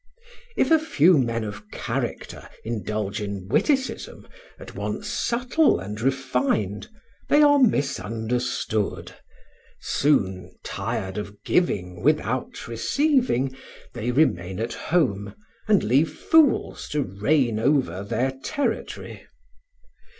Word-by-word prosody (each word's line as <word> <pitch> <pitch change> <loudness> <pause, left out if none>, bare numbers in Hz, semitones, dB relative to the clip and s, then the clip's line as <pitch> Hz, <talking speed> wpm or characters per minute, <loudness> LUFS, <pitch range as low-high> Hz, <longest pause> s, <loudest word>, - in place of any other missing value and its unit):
If - - +2
a 320 - +7
few 180 - +4
men 115 -3 0
of 105 0 -7
character - - -4
indulge 105 -2 -3
in 100 -2 -5
witticism, 265 - 0 0.3
at - - -11
once - - -4
subtle 250 +6 +1
and 105 +4 -6
refined, 130 -6 0 0.4
they 295 +1 +6
are 290 -1 +6
misunderstood; 120 - -1 0.7
soon, 95 -11 0
tired 95 +1 -3
of 105 0 -9
giving 90 - 0
without - - 0
receiving, 135 - +1 0.4
they 120 0 -3
remain 105 - +1
at 115 +1 -2
home, 115 - 0 0.3
and 210 -2 +4
leave 140 +8 +3
fools 315 - +2
to 150 -1 0
reign 115 +4 +1
over 115 - +1
their 125 +6 0
territory. 285 - -3
120 Hz, 105 wpm, -24 LUFS, 105-160 Hz, 0.7 s, a